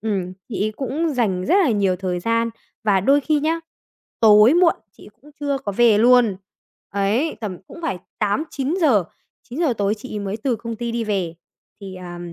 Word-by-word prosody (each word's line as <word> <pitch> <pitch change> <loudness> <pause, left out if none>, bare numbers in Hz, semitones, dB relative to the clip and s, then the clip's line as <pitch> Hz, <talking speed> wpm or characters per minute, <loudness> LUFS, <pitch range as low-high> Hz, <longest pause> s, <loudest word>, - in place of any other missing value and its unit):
ừm, 195 -4 -2 0.2
chị 205 -3 -2
ấy 215 - -1
cũng 285 +4 -2
dành 195 -7 0
rất - - +3
là 285 - +2
nhiều 200 -4 +1
thời 180 -1 -3
gian 230 +3 0 0.3
và 200 -3 +3
đôi 275 +9 +4
khi 300 +1 +1
nhá, 325 +2 0 0.6
tối 215 +4 +7
muộn 345 -1 +4 0.2
chị - - -17
ấy - - -13
cũng 295 - -16
chưa 285 -1 -1
có 235 -7 -5
về 225 0 +4
luôn. 240 -4 +5 0.5
Ấy, 205 +10 0
tầm 200 -5 -5
cũng 335 - -11
phải 265 - -2 0.2
8:00-9:00, 275 - +1 0.4
9:00 290 +2 -1
tối 200 +1 +1
chị 225 +3 -10
ấy - - -2
mới 200 +1 -3
từ 240 +1 -1
công 230 +1 -6
ty 235 +1 -4
đi 230 0 -2
về. 190 -6 -2 0.5
Thì, 195 -2 -8
à, 175 -1 -8
225 Hz, 195 wpm, -21 LUFS, 200-275 Hz, 0.6 s, tối